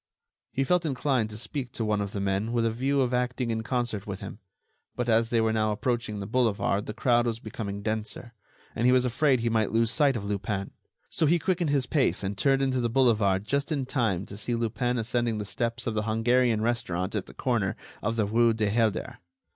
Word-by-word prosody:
He 135 Hz, -, 0 dB
felt 180 Hz, +5 st, +2 dB
inclined 130 Hz, -6 st, 0 dB
to 105 Hz, -, -6 dB
speak 125 Hz, +3 st, -4 dB
to 115 Hz, -, -2 dB
one 105 Hz, -1 st, +1 dB
of 100 Hz, -1 st, -3 dB
the 100 Hz, -, -4 dB
men 100 Hz, +3 st, -1 dB
with 115 Hz, -1 st, +2 dB
a 115 Hz, -, +2 dB
view 135 Hz, +4 st, +1 dB
of 125 Hz, -1 st, 0 dB
acting 125 Hz, -1 st, 0 dB
in 110 Hz, 0 st, -1 dB
concert 115 Hz, -3 st, -2 dB
with 100 Hz, -2 st, -5 dB
him; -, -, -8 dB, 0.6 s
but 120 Hz, -, -2 dB
as 115 Hz, 0 st, +3 dB
they 120 Hz, -, +2 dB
were 110 Hz, 0 st, +2 dB
now 110 Hz, -1 st, +1 dB
approaching 115 Hz, -1 st, -2 dB
the 100 Hz, -, -4 dB
boulevard 105 Hz, -3 st, +1 dB
the 105 Hz, -, -4 dB
crowd 120 Hz, 0 st, +2 dB
was 115 Hz, -1 st, -1 dB
becoming 100 Hz, -2 st, -6 dB
denser, 110 Hz, +2 st, -4 dB, 0.4 s
and 120 Hz, -, +2 dB
he -, -, +6 dB
was 130 Hz, 0 st, +4 dB
afraid 130 Hz, 0 st, +2 dB
he 120 Hz, -, 0 dB
might 110 Hz, -3 st, +1 dB
lose 115 Hz, 0 st, +2 dB
sight 140 Hz, -2 st, +3 dB
of 100 Hz, -, -5 dB
Lupin. 100 Hz, -1 st, -3 dB, 0.4 s
So 160 Hz, -, +1 dB
he 170 Hz, +4 st, +4 dB
quickened 175 Hz, -2 st, 0 dB
his 140 Hz, -3 st, +2 dB
pace 135 Hz, -6 st, +1 dB
and 100 Hz, +1 st, -2 dB
turned 135 Hz, +5 st, +2 dB
into 130 Hz, -2 st, +1 dB
the 120 Hz, -, 0 dB
boulevard 110 Hz, -6 st, +3 dB
just 140 Hz, +5 st, -1 dB
in 140 Hz, -4 st, 0 dB
time 110 Hz, -9 st, 0 dB
to 100 Hz, -, -9 dB
see 120 Hz, +3 st, -2 dB
Lupin 120 Hz, +2 st, -1 dB
ascending 120 Hz, 0 st, 0 dB
the 105 Hz, -, -3 dB
steps 115 Hz, +3 st, -2 dB
of 115 Hz, -, -1 dB
the 105 Hz, -, 0 dB
Hungarian 115 Hz, +1 st, +2 dB
restaurant 100 Hz, -6 st, -1 dB
at 105 Hz, -3 st, -2 dB
the -, -, -13 dB
corner 115 Hz, -7 st, 0 dB, 0.3 s
of 110 Hz, +2 st, -1 dB
the 110 Hz, -2 st, +1 dB
rue 115 Hz, +2 st, +3 dB
du 105 Hz, -2 st, 0 dB
Helder. 110 Hz, -1 st, 0 dB
115 Hz, 225 wpm, -27 LUFS, 105-125 Hz, 0.6 s, he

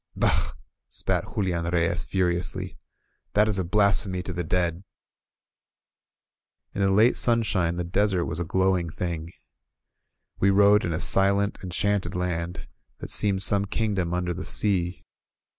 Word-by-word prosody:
'^Bah -, -, +1 dB, 0.2 s
!" -, -, -60 dB
spat -, -, -1 dB
Julian 90 Hz, -4 st, -1 dB
Reyes 85 Hz, 0 st, 0 dB
furiously. 90 Hz, -2 st, -2 dB, 0.6 s
^^That 105 Hz, +1 st, +4 dB
is 105 Hz, -3 st, 0 dB
a -, -, 0 dB
blasphemy 100 Hz, -1 st, +1 dB
to 95 Hz, -, -5 dB
the 90 Hz, 0 st, -3 dB
dead 85 Hz, +1 st, -1 dB, 0.9 s
!" -, -, -60 dB
In 100 Hz, -, -3 dB
the 95 Hz, -, +3 dB
late 110 Hz, +5 st, +4 dB
sunshine 105 Hz, -8 st, +2 dB
the 90 Hz, -, -2 dB
desert 95 Hz, +1 st, 0 dB
was 85 Hz, -, -4 dB
a -, -, 0 dB
glowing 95 Hz, 0 st, +1 dB
thing. 85 Hz, 0 st, -4 dB, 1.1 s
We 100 Hz, -, +3 dB
rode 100 Hz, +2 st, +5 dB
in 85 Hz, -, -2 dB
a 80 Hz, -, -2 dB
silent, 100 Hz, +2 st, +2 dB
enchanted 95 Hz, 0 st, -1 dB
land, 90 Hz, -1 st, -3 dB, 0.3 s
that -, -, -7 dB
seemed 100 Hz, -2 st, +2 dB
some 100 Hz, 0 st, +2 dB
kingdom 100 Hz, -4 st, -1 dB
under 90 Hz, 0 st, -1 dB
the 90 Hz, +2 st, -6 dB
sea. 95 Hz, -4 st, -1 dB
95 Hz, 145 wpm, -25 LUFS, 85-100 Hz, 1.1 s, rode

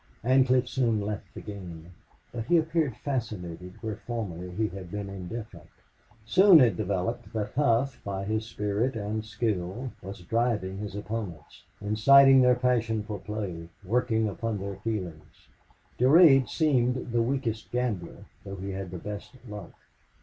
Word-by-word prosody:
Ancliffe 130 Hz, 0 st, +4 dB
soon 120 Hz, -4 st, +1 dB
left 105 Hz, 0 st, -5 dB
the -, -, -7 dB
game. 90 Hz, -5 st, -9 dB, 0.4 s
But 115 Hz, -2 st, -5 dB
he 175 Hz, -, +4 dB
appeared 160 Hz, -6 st, 0 dB
fascinated 90 Hz, -, -4 dB
where 110 Hz, -2 st, -4 dB
formerly 95 Hz, -7 st, -5 dB
he 105 Hz, +5 st, -1 dB
had 95 Hz, -1 st, -8 dB
been 100 Hz, +1 st, -5 dB
indifferent. 95 Hz, -2 st, -8 dB, 0.6 s
Soon 185 Hz, -, +7 dB
it 120 Hz, -8 st, +4 dB
developed 100 Hz, +6 st, -2 dB
that 105 Hz, -2 st, -2 dB
Hough, 130 Hz, -1 st, +1 dB
by 100 Hz, -1 st, -3 dB
his 110 Hz, +1 st, -2 dB
spirit 105 Hz, +4 st, -1 dB
and 110 Hz, 0 st, -3 dB
skill, 110 Hz, +1 st, -3 dB
was 95 Hz, -1 st, -8 dB
driving 110 Hz, -2 st, -1 dB
his 105 Hz, -1 st, -6 dB
opponents, 105 Hz, -7 st, -6 dB
inciting 135 Hz, +6 st, +6 dB
their 125 Hz, 0 st, +5 dB
passion 115 Hz, -3 st, +1 dB
for 105 Hz, -1 st, -6 dB
play, 95 Hz, -5 st, -5 dB, 0.2 s
working 110 Hz, +1 st, +1 dB
upon 110 Hz, +1 st, -3 dB
their 100 Hz, 0 st, -5 dB
feelings. 90 Hz, -8 st, -6 dB, 0.5 s
Durade 135 Hz, 0 st, +6 dB
seemed 125 Hz, -6 st, +1 dB
the 120 Hz, 0 st, +2 dB
weakest 115 Hz, -3 st, -2 dB
gambler, 120 Hz, -8 st, -3 dB, 0.2 s
though 100 Hz, -, -7 dB
he 95 Hz, +1 st, -5 dB
had 95 Hz, -1 st, -5 dB
the 90 Hz, -, -6 dB
best 105 Hz, +7 st, -7 dB
luck. 105 Hz, -1 st, -8 dB
110 Hz, 145 wpm, -28 LUFS, 95-125 Hz, 0.6 s, Soon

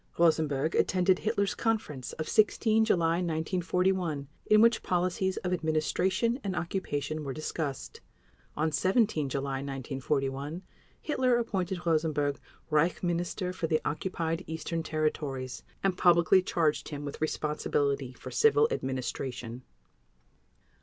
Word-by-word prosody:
Rosenberg 155 Hz, -3 st, +2 dB
attended 185 Hz, 0 st, +3 dB
Hitler's 200 Hz, -3 st, 0 dB
conference 215 Hz, -, -2 dB
of 155 Hz, -1 st, -4 dB
16 220 Hz, +1 st, +3 dB
July 165 Hz, -5 st, +2 dB
1941, 175 Hz, -2 st, 0 dB, 0.2 s
in 215 Hz, -, +6 dB
which 230 Hz, +1 st, +5 dB
policies 185 Hz, +1 st, 0 dB
of 180 Hz, -1 st, -2 dB
administration 180 Hz, -, +1 dB
and 190 Hz, -2 st, -2 dB
occupation 155 Hz, -4 st, -2 dB
were 135 Hz, -2 st, -4 dB
discussed. 155 Hz, -2 st, -4 dB, 0.6 s
On 155 Hz, +1 st, +1 dB
17 185 Hz, -, +2 dB
July 135 Hz, 0 st, -2 dB
1941 135 Hz, +3 st, -3 dB, 0.4 s
Hitler 255 Hz, -5 st, +2 dB
appointed 190 Hz, -6 st, -2 dB
Rosenberg 155 Hz, -3 st, +1 dB, 0.3 s
Reich 155 Hz, +4 st, +2 dB
Minister 175 Hz, +1 st, -1 dB
for 170 Hz, -, -2 dB
the 155 Hz, -1 st, +2 dB
Occupied 165 Hz, +2 st, -2 dB
Eastern 160 Hz, +1 st, -3 dB
Territories, 150 Hz, -5 st, -2 dB, 0.2 s
and 195 Hz, -2 st, +2 dB
publicly 175 Hz, +1 st, +5 dB
charged 165 Hz, -4 st, 0 dB
him 145 Hz, -1 st, -5 dB
with 145 Hz, -, -7 dB
responsibility 145 Hz, -3 st, -1 dB
for -, -, -10 dB
civil 445 Hz, 0 st, +4 dB
administration. 125 Hz, -, -4 dB
165 Hz, 115 wpm, -29 LUFS, 145-185 Hz, 0.6 s, in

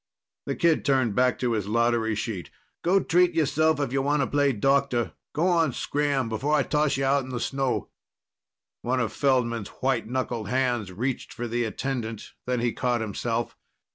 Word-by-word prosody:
The -, -, -1 dB
kid 165 Hz, -2 st, +2 dB
turned 130 Hz, -6 st, +2 dB
back 125 Hz, +3 st, +2 dB
to 125 Hz, -2 st, 0 dB
his 105 Hz, -3 st, -1 dB
lottery 115 Hz, 0 st, +1 dB
sheet. 105 Hz, -6 st, -4 dB, 0.3 s
"Go 190 Hz, +3 st, +4 dB
treat 175 Hz, 0 st, +3 dB
yourself 155 Hz, 0 st, +2 dB
if 135 Hz, -3 st, -1 dB
you 135 Hz, -, +2 dB
wanta 140 Hz, 0 st, +1 dB
play 145 Hz, 0 st, +2 dB
doctor. 135 Hz, 0 st, +1 dB, 0.2 s
Go 155 Hz, +4 st, 0 dB
on, 165 Hz, -6 st, +2 dB
scram 145 Hz, -3 st, 0 dB
before 130 Hz, +7 st, 0 dB
I 145 Hz, -, +3 dB
toss 150 Hz, -1 st, +1 dB
you 135 Hz, -, 0 dB
out 140 Hz, +1 st, +3 dB
in 130 Hz, -, -9 dB
the 125 Hz, -1 st, -3 dB
snow!" 135 Hz, 0 st, -1 dB, 0.9 s
One 130 Hz, +2 st, 0 dB
of 120 Hz, -3 st, -1 dB
Feldman's 120 Hz, -6 st, +1 dB
white 135 Hz, -4 st, +1 dB
knuckled 120 Hz, -4 st, -2 dB
hands 125 Hz, -6 st, 0 dB
reached 125 Hz, +8 st, -3 dB
for 120 Hz, -, -5 dB
the 120 Hz, +1 st, -1 dB
attendant. 115 Hz, -1 st, -4 dB
Then 125 Hz, -1 st, 0 dB
he 120 Hz, -1 st, 0 dB
caught 120 Hz, -2 st, 0 dB
himself. 115 Hz, +2 st, -2 dB
130 Hz, 175 wpm, -26 LUFS, 115-140 Hz, 0.9 s, Go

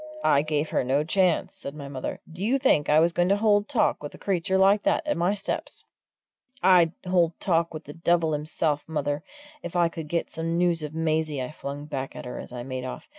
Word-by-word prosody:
"I 140 Hz, -, +4 dB
gave 155 Hz, 0 st, -1 dB
her -, -, +1 dB
no 135 Hz, +4 st, +1 dB
chance," 180 Hz, +1 st, +1 dB
said 140 Hz, -, -7 dB
my 145 Hz, -2 st, -7 dB
mother. 135 Hz, -2 st, -5 dB
"Do 170 Hz, +3 st, -7 dB
you 245 Hz, +6 st, +2 dB
think 205 Hz, -, +2 dB
I 150 Hz, +1 st, +6 dB
was 165 Hz, +2 st, +4 dB
going 175 Hz, +1 st, +2 dB
to 200 Hz, -, +4 dB
hold 205 Hz, 0 st, +2 dB
talk 260 Hz, -6 st, +1 dB
with 145 Hz, -, -7 dB
a -, -, -12 dB
creature 190 Hz, -1 st, 0 dB
like 195 Hz, +2 st, +5 dB
that 320 Hz, -, +1 dB
at 300 Hz, -, 0 dB
my 180 Hz, +4 st, +1 dB
steps?" 200 Hz, -, -3 dB, 0.8 s
"I'd 175 Hz, -3 st, +5 dB
hold 175 Hz, -3 st, +2 dB
talk 170 Hz, -2 st, +1 dB
with 155 Hz, 0 st, -7 dB
the 145 Hz, -, -10 dB
devil 165 Hz, -1 st, +1 dB
himself, 150 Hz, 0 st, -1 dB
mother, 145 Hz, -2 st, -2 dB, 0.4 s
if 175 Hz, -, -7 dB
I 170 Hz, -1 st, +3 dB
could 160 Hz, -2 st, -7 dB
get 170 Hz, +2 st, -2 dB
some 165 Hz, +1 st, -2 dB
news 175 Hz, -2 st, +2 dB
of 150 Hz, 0 st, -6 dB
Maisie!" 160 Hz, -2 st, 0 dB
I 130 Hz, +2 st, -4 dB
flung 145 Hz, -1 st, -6 dB
back 135 Hz, -3 st, -5 dB
at -, -, -7 dB
her 125 Hz, -, -6 dB
as -, -, -9 dB
I 120 Hz, -1 st, -6 dB
made 130 Hz, 0 st, -5 dB
off. 130 Hz, -, -7 dB
165 Hz, 230 wpm, -26 LUFS, 145-180 Hz, 0.8 s, I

